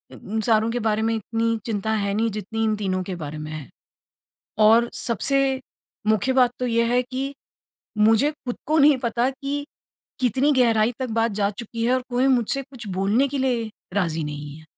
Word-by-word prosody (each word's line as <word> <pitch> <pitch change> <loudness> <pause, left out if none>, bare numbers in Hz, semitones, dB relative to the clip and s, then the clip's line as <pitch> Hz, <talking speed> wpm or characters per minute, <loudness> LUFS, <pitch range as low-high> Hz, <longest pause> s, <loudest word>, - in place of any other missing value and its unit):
उम, 220 +2 -4
सारों 220 0 +2
के 245 - -1
बारे 220 -1 0
में 225 0 +1
इतनी 230 +1 -1
चिंता 220 -1 -2
है 200 -2 0
नहीं 225 +2 +1
जितनी 215 +2 -3
इन 215 -1 +2
तीनों 190 -3 -1
के 185 -1 -5
बारे 155 -2 -6
में 155 0 -6
है। 155 -4 -7 1.0
और 235 +2 +5
सबसे 270 +3 +1 0.5
मुख्य 220 +4 +2
बात 250 -2 +4
तो 250 - -1
ये 230 0 +2
है 250 - +4
कि 265 +3 -4 0.6
मुझे 225 +7 +4
खुद 260 -5 -7
को 310 +1 +2
नहीं 290 -1 +6
पता 240 0 0
कि 280 +2 -4 0.6
कितनी 260 +4 +2
गहराई 230 -3 +3
तक 255 - -2
बात 225 +1 +1
जा 200 0 +1
चुकी 230 +2 -5
है 250 - +3
और 255 - 0
कोई 250 +2 +2
मुझसे 260 +2 +1
कुछ 255 -5 -10
बोलने 220 +8 +2
के 280 +1 -3
लिए 240 -4 0 0.2
राज़ी 165 -5 0
नहीं 145 0 -6
है। 160 - -15
230 Hz, 190 wpm, -23 LUFS, 210-255 Hz, 1.0 s, नहीं